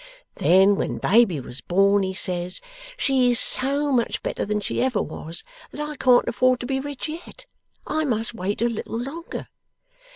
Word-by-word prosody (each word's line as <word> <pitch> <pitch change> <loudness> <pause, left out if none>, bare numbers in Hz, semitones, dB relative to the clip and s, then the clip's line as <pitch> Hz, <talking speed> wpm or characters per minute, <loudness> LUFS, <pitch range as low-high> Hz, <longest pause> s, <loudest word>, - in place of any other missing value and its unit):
Then 190 +3 +4
when - - -2
baby 205 -7 +3
was 125 0 -7
born, 195 +3 +3
he 190 0 -2
says, 180 -1 0 0.4
"She 260 -2 +2
is 240 - +4
so 280 +2 +3
much 240 -3 0
better - - -2
than 210 +1 -1
she 205 - -2
ever 250 -4 +1
was, 165 +2 -6 0.3
that - - -11
I 300 0 -4
can't 250 -3 +4
afford 255 +1 +2
to - - -4
be 265 +1 -1
rich 285 0 -5
yet. 340 +10 -9 0.4
I 315 0 -1
must 230 -5 -1
wait 205 +1 -2
a - - +3
little 230 -1 -4
longer." 280 +8 -6
240 Hz, 175 wpm, -23 LUFS, 195-270 Hz, 0.4 s, Then